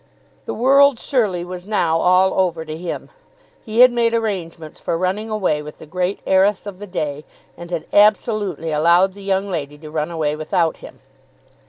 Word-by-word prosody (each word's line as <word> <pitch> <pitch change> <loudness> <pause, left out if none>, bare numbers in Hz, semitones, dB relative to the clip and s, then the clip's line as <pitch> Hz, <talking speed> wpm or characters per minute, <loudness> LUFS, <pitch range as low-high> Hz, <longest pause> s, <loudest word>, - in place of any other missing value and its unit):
The - - -4
world 275 +2 +5
surely 210 - -1
was 180 +1 -8
now 165 -6 +1
all 185 +2 +3
over 170 -4 0
to 155 0 -6
him. 170 +1 -6 0.5
He 220 +2 +1
had 255 0 +8
made 235 -1 +1
arrangements 175 -8 -4
for 165 - -2
running 190 +5 -2
away 190 -8 0
with 150 0 -10
the - - -12
great 180 +4 -2
heiress 190 +2 +2
of 200 -2 -8
the 205 - -8
day, 150 -5 -4 0.3
and 170 0 -10
had 170 -2 -4
absolutely 205 -5 +2
allowed 170 +5 +3
the 200 - -13
young 195 0 -1
lady 150 -4 -4
to 155 0 -11
run 155 0 -2
away 155 -3 -1
without 160 +1 0
him. - - -13
185 Hz, 180 wpm, -20 LUFS, 160-205 Hz, 0.5 s, had